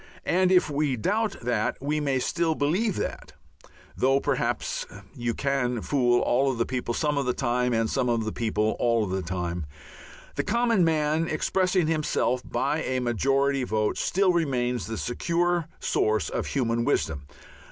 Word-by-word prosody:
And 185 +1 +2
if 180 -1 +5
we 145 -2 0
doubt 210 - 0
that 120 -3 0
we 150 +3 -1
may 140 -3 0
still 165 +4 0
believe 175 +9 +1
that, 75 - -5 0.6
though 135 +1 +3
perhaps - - -1 0.3
"you 120 -3 -2
can 135 -3 0
fool 120 -4 +2
all 135 +2 +2
the 115 0 0
people 125 -2 -3
some 150 -2 0
of 135 - -2
the 125 - +1
time, 125 -1 0
and 115 -1 +1
some 125 +2 0
of 115 -2 0
the 110 - -2
people 110 -1 0
all 115 -2 +2
the 95 0 -2
time," 90 -2 -3 0.7
the - - +1
common 230 -3 +2
man, 160 0 +1
expressing 185 +3 +1
himself 150 -5 0
by 145 +4 -1
a 130 0 -1
majority 135 +3 +1
vote, 110 -3 0
still 190 -1 +2
remains 125 -7 0
the 110 0 -4
secure 170 +7 0
source 110 -8 +1
of - - -3
human 115 -3 0
wisdom. 80 - -1
135 Hz, 160 wpm, -26 LUFS, 115-160 Hz, 0.7 s, if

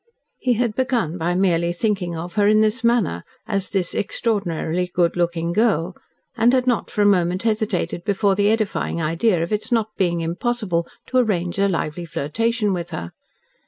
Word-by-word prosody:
He 250 - +2
had 235 -1 0
begun 235 - 0
by 175 +2 0
merely 175 -2 +2
thinking 180 -3 -1
of 170 +2 -6
her 205 -1 +3
in 215 +1 +5
this 220 +2 +1
manner 235 - +2 0.3
as 200 -3 -1
"this 185 -3 0
extraordinarily 180 -5 -1
good 175 -2 +1
looking 170 -1 -1
girl," 195 -5 +1 0.4
and 235 +1 +4
had 255 -1 +2
not, 245 -3 0
for 210 - 0
a - - +3
moment, 185 -1 +2
hesitated 215 -6 -1
before 200 0 +2
the 205 +1 +2
edifying 215 -5 -1
idea 165 +3 +1
of 170 - -3
its 210 - -2
not 225 -2 +2
being 175 -3 +1
impossible 175 0 -1 0.2
to 255 - -1
arrange 185 -6 0
a 200 - +4
lively 170 -2 -2
flirtation 210 - -1
with 175 -1 -4
her. 85 - -6
195 Hz, 175 wpm, -21 LUFS, 170-220 Hz, 0.4 s, in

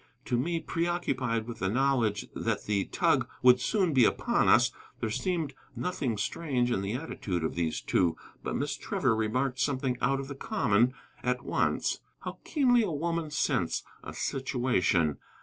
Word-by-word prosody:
To - - 0
me, 165 +7 0
preoccupied 160 -10 -1
with 120 0 -7
the 95 - 0
knowledge 120 -3 +1
that - - -1
the 100 -2 0
tug - - +1
would 125 0 +7
soon 185 - +1
be 130 -3 +6
upon - - +2
us, - - +5 0.3
there 110 - -2
seemed 165 - -1 0.2
nothing 135 -11 -2
strange 125 +2 0
in 95 - +1
the 100 +2 -2
attitude 105 - -3
of 80 - -1
these 85 -2 -1
two, 85 -3 +1 0.2
but - - -3
Miss - - -1
Trevor 115 - 0
remarked 125 +4 0
something 130 -3 0
out 135 +2 +2
of 135 - -5
the 140 - -5
common 125 - +1 0.3
at 125 0 -1
once. - - 0 0.2
How - - -6
keenly 250 -6 +3
a 210 - 0
woman 165 +1 -2
scents 150 - 0 0.2
a - - -6
situation. 120 - +1
125 Hz, 165 wpm, -29 LUFS, 110-155 Hz, 0.3 s, would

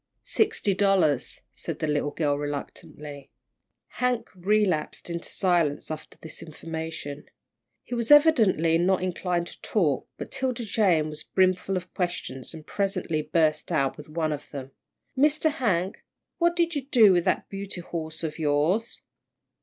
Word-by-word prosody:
"Sixty 410 - +1
dollars," 190 -9 +2
said 145 +4 -5
the 160 - -2
little 150 -1 0
girl, 145 -1 0
reluctantly. 145 0 -6 0.7
Hank 250 -2 0
relapsed 185 -4 0
into 170 0 -4
silence 170 -6 +1
after 155 0 -7
this 160 -1 -9
information. 160 -2 -6 0.6
He - - -8
was 235 -2 -1
evidently 220 - +5
not 185 +1 +2
inclined 180 -1 -1
to - - -11
talk, 155 - +1
but - - -7
'Tilda 255 -3 -2
Jane 190 -7 +2
was 150 - -5
brimful 185 0 +1
of 180 0 -7
questions, 175 -8 -3
and 155 -1 -10
presently 195 -6 -1
burst 155 -1 +1
out 135 -1 +1
with 150 0 -11
one 155 -1 -1
of 150 - -8
them. 135 -2 -7 0.4
"Mr. 300 +3 +3
Hank, 195 - -1 0.4
what 340 0 +3
did 340 -1 +1
you 290 - -1
do 225 -8 +6
with 175 -1 +2
that - - +1
beauty 195 -2 -6
horse 160 -2 -5
of 155 0 -4
yours?" 155 +9 +1
175 Hz, 145 wpm, -26 LUFS, 155-205 Hz, 0.7 s, do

